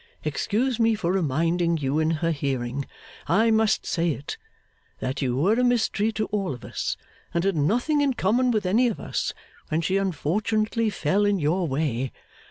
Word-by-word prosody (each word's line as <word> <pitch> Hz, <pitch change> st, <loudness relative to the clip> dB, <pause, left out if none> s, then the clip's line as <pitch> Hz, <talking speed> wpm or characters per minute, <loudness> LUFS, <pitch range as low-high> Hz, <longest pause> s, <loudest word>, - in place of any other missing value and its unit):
Excuse 240 Hz, +3 st, 0 dB
me 225 Hz, -1 st, +4 dB
for 180 Hz, -5 st, -1 dB
reminding 170 Hz, 0 st, +1 dB
you 145 Hz, 0 st, 0 dB
in 160 Hz, 0 st, +2 dB, 0.2 s
her 165 Hz, -, +2 dB
hearing 135 Hz, -3 st, -2 dB, 0.4 s
I 220 Hz, +8 st, +4 dB
must 220 Hz, -1 st, +2 dB
say 170 Hz, 0 st, 0 dB
it 140 Hz, +1 st, -6 dB, 0.6 s
that 130 Hz, +3 st, -3 dB
you 125 Hz, -2 st, 0 dB
were 180 Hz, +10 st, +3 dB
a -, -, +3 dB
mystery 225 Hz, -3 st, +2 dB
to 215 Hz, 0 st, -1 dB
all 195 Hz, -9 st, -1 dB
of 120 Hz, -, -12 dB
us, -, -, -3 dB, 0.4 s
and 170 Hz, -, +2 dB
had 195 Hz, -1 st, +1 dB
nothing 240 Hz, -, +2 dB
in 275 Hz, -3 st, +1 dB
common 240 Hz, +7 st, +2 dB
with 215 Hz, -4 st, +1 dB
any 225 Hz, +7 st, +3 dB
of 230 Hz, -, -2 dB
us -, -, -2 dB, 0.3 s
when 155 Hz, +2 st, +1 dB
she 190 Hz, +3 st, +1 dB
unfortunately 215 Hz, +5 st, 0 dB
fell 190 Hz, +1 st, +1 dB
in 205 Hz, -1 st, +3 dB
your 170 Hz, +3 st, +1 dB
way. 135 Hz, -3 st, -1 dB
185 Hz, 180 wpm, -25 LUFS, 150-220 Hz, 0.6 s, me